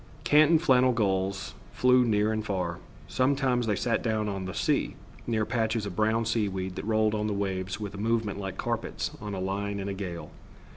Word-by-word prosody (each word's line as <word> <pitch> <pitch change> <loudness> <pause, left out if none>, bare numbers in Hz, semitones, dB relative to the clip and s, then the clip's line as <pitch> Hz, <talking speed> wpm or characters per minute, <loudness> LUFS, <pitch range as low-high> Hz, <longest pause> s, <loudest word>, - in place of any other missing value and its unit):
Canton 155 +2 +6
flannel 130 -6 +4
gulls 95 -3 -1 0.2
flew 125 0 +4
near 105 -2 +2
and 110 0 -1
far. 90 -5 -2 0.3
Sometimes 130 -2 +1
they 105 - +2
sat 115 +4 0
down 110 -2 0
on 95 -2 -3
the 95 - -5
sea, - - 0 0.3
near 110 -2 +1
patches 110 -2 0
of 95 - -5
brown 110 +2 +1
seaweed 95 -5 -1
that - - -5
rolled 110 -1 +2
on 105 0 -1
the 105 - -1
waves 95 -1 -2
with 105 -2 -5
a 100 - -7
movement 110 -2 0
like 95 -1 -5
carpets - - -2
on 105 -2 -4
a - - -4
line 100 +2 -2
in 100 - -4
a 100 - -2
gale. 95 -3 -6
105 Hz, 195 wpm, -28 LUFS, 95-115 Hz, 0.3 s, Canton